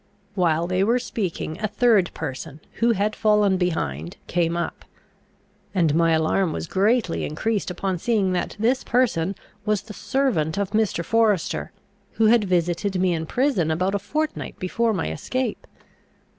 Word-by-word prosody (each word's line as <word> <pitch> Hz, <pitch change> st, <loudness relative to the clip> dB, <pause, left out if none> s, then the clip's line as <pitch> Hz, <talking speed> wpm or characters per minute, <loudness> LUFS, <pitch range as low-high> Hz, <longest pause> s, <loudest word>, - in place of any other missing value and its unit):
While 170 Hz, -4 st, +2 dB
they 185 Hz, +2 st, +1 dB
were 230 Hz, +4 st, +3 dB
speaking 190 Hz, -9 st, -3 dB
a 215 Hz, -, +1 dB
third 215 Hz, -4 st, +3 dB
person, 135 Hz, +3 st, -6 dB, 0.2 s
who 235 Hz, 0 st, +4 dB
had 210 Hz, +1 st, 0 dB
fallen 210 Hz, -3 st, +3 dB
behind, 85 Hz, -, -2 dB
came 170 Hz, -1 st, 0 dB
up; 170 Hz, -, -4 dB, 0.9 s
and 165 Hz, -5 st, +3 dB
my 165 Hz, +1 st, +3 dB
alarm 160 Hz, +3 st, +2 dB
was -, -, -4 dB
greatly 200 Hz, +1 st, +1 dB
increased 205 Hz, +8 st, -1 dB
upon 180 Hz, 0 st, -2 dB
seeing 205 Hz, -2 st, +1 dB
that 180 Hz, -, -2 dB
this 245 Hz, +5 st, +1 dB
person 200 Hz, -7 st, +1 dB, 0.3 s
was 210 Hz, -2 st, 0 dB
the 215 Hz, -, -10 dB
servant 200 Hz, -, 0 dB
of 200 Hz, -1 st, -1 dB
Mr. 215 Hz, -6 st, 0 dB
Forester, 220 Hz, -6 st, +1 dB, 0.4 s
who 225 Hz, -, +2 dB
had 220 Hz, -1 st, +5 dB
visited 180 Hz, +1 st, 0 dB
me 180 Hz, -1 st, +2 dB
in 160 Hz, -1 st, -3 dB
prison 245 Hz, -, +1 dB
about 180 Hz, +5 st, 0 dB
a 200 Hz, -, +1 dB
fortnight 305 Hz, +10 st, -3 dB
before 225 Hz, +5 st, 0 dB
my 185 Hz, -, -2 dB
escape. 255 Hz, -, -3 dB
195 Hz, 155 wpm, -23 LUFS, 170-220 Hz, 0.9 s, had